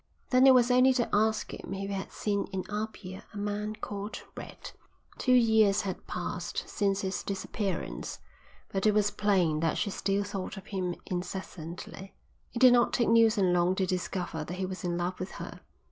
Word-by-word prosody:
Then 255 +1 +6
it 260 - +9
was 245 0 +5
only 255 +1 +6
to 245 -2 +1
ask 215 +1 +2
him - - -8
if - - -5
he 195 - -3
had 195 -1 -4
seen 200 -1 -1
in 190 -1 -2
Apia 210 -3 -5
a - - -5
man 210 +1 -2
called 205 0 -6
Red. - - -9 0.5
Two 255 -1 +4
years 220 -4 +5
had 190 -3 -5
passed - - -4
since 200 -1 0
his 190 0 -2
disappearance, 190 - -3 0.5
but 195 +2 0
it 210 - +4
was 205 -1 +3
plain 180 -7 +2
that 165 0 +1
she 200 - -1
still 195 +1 0
thought 195 0 -5
of 195 - -9
him 185 -3 -2
incessantly. 180 0 -6 0.4
It - - -6
did 250 0 +8
not 240 -1 +4
take 235 - +2
Neilson 220 -5 +5
long 175 +1 +3
to 190 - +1
discover 180 -3 -2
that 175 +4 -6
he 190 0 -2
was 185 +1 -6
in 175 -1 -1
love 175 +1 -2
with 185 - -5
her. - - -8
195 Hz, 190 wpm, -29 LUFS, 185-215 Hz, 0.5 s, it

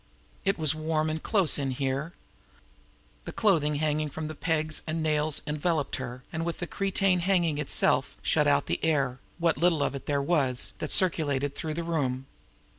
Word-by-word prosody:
It 195 - +2
was 155 -2 +2
warm 155 0 -1
and 160 0 -3
close 195 -7 +3
here. 135 +3 -2 1.1
The - - -5
clothing 160 -9 +2
hanging 150 0 0
from 155 +2 -5
the - - -5
pegs 155 -1 -1
and 160 +1 -1
nails 150 -1 +1
enveloped 150 0 -1
her, 125 -1 -6
and, 160 +1 -2
with 170 0 -3
the 175 - -3
cretonne 195 -1 +1
hanging 175 -4 +1
itself, 150 - +2
shut - - +2
out - - +3
the 85 - -2
air, 140 -5 +1 0.2
what 170 -1 +1
little 165 -4 +3
of - - -1
it 140 - -7
there 145 -1 +1
was, 140 -4 0
that 155 - -4
circulated 145 -6 +1
through 155 0 -4
the 170 - -2
room. 135 -6 -1
155 Hz, 175 wpm, -28 LUFS, 145-165 Hz, 1.1 s, close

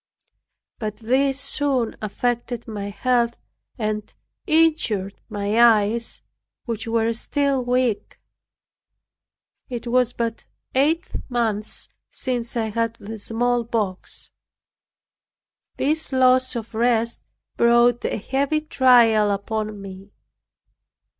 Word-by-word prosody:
But 215 -2 -4
this 265 +4 +1
soon 275 -6 0
affected 240 +2 -2
my 205 -2 -5
health 235 +2 +1 0.4
and 215 -1 -3 0.4
injured 310 - +2
my 205 +1 0
eyes, 230 0 +3 0.4
which 230 -3 -4
were 230 0 +1
still 275 +2 0
weak. 245 -3 0 1.5
It 240 -2 -5
was 245 0 +2
but 230 -2 -3 0.3
eight 310 +7 +2 0.2
months 225 -4 -2 0.2
since 240 -2 -3
I 220 -2 -1
had 230 +1 -1
the 220 0 -8
smallpox. 230 -3 -1 1.5
This 310 +2 0
loss 255 0 +4
of 230 -1 -5
rest 230 0 +1 0.3
brought 235 0 +4
a - - -1
heavy 275 +7 0
trial 240 -7 +5
upon 210 +1 -2
me. 195 0 -10
235 Hz, 95 wpm, -23 LUFS, 215-255 Hz, 1.5 s, trial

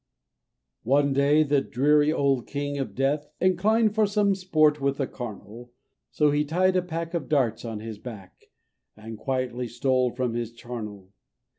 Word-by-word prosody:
"] 65 0 -57
One 140 +3 +2
day 145 +3 +4
the 145 -2 +2
dreary 145 +4 +2
old 140 -5 +1
King 145 0 -3
of 135 - -4
Death 145 +3 0
Inclined 210 +4 +2
for 215 -1 +3
some 205 -1 +2
sport 155 -6 +2
with 140 0 0
the 135 - 0
carnal, 120 0 -9 0.4
So 150 -1 +2
he 145 +1 +2
tied 185 +5 +1
a 185 - +3
pack 165 -1 -5
of 170 -3 -3
darts 130 -7 +1
on 110 -2 -5
his 110 -2 -7
back, 105 -7 -11 0.5
And 110 +1 -8
quietly 125 +1 -3
stole 125 +2 +1
from 125 -1 -2
his 115 -1 -4
charnel. 105 -5 -8
140 Hz, 165 wpm, -26 LUFS, 120-155 Hz, 0.5 s, day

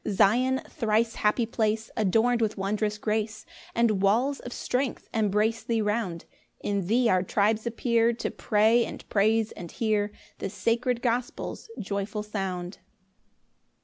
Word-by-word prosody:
2 - - -2
Zion, 250 +7 +3
thrice 225 0 +1
happy 215 +3 +1
place, 220 -1 -1
Adorn'd 225 +3 +2
with 220 -1 0
wondrous 210 +2 -1
grace, 215 +1 -2 0.3
And 225 -4 +2
walls 240 +8 +2
of 245 - -8
strength 255 +2 -2
embrace 220 +1 +1
thee 230 -1 -1
round; 210 -5 -1 0.3
In 200 -3 -2
thee 240 +4 +3
our 185 -4 +3
tribes 215 +4 +1
appear 235 0 +2
To 235 - -3
pray, 220 +3 +3
and - - -7
praise, 220 +2 +2
and 170 -2 -9
hear 210 -2 0 0.3
The - - -3
sacred 235 +4 0
gospel's 245 - -2
joyful 200 +2 -3
sound. 190 -3 -4
220 Hz, 140 wpm, -27 LUFS, 205-235 Hz, 0.3 s, Zion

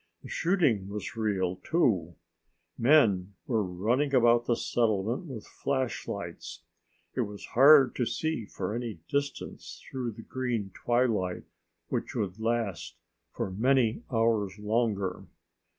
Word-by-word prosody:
The - - -10
shooting 150 - +1
was 105 +1 -5
real 95 -5 0
too. 95 - +1 0.6
Men 110 -8 +4
were 115 -7 +1
running 115 +11 0
about 120 -1 +5
the 120 - +3
settlement 115 - 0
with 125 -7 -7
flashlights. 130 -9 -4 0.5
It - - 0
was 105 -3 -5
hard 135 0 +7
to 125 - +1
see 155 -9 -2
for 95 +2 -4
any 115 -7 -4
distance 140 0 -3
through 125 -3 -3
the 115 - -11
green 120 -7 -3
twilight 115 -7 0 0.5
which - - -3
would 100 -1 -2
last 115 -5 -2 0.4
for 95 - -3
many 120 +2 +2
hours 110 -4 +1
longer. 105 -3 -1
115 Hz, 120 wpm, -29 LUFS, 100-130 Hz, 0.6 s, hard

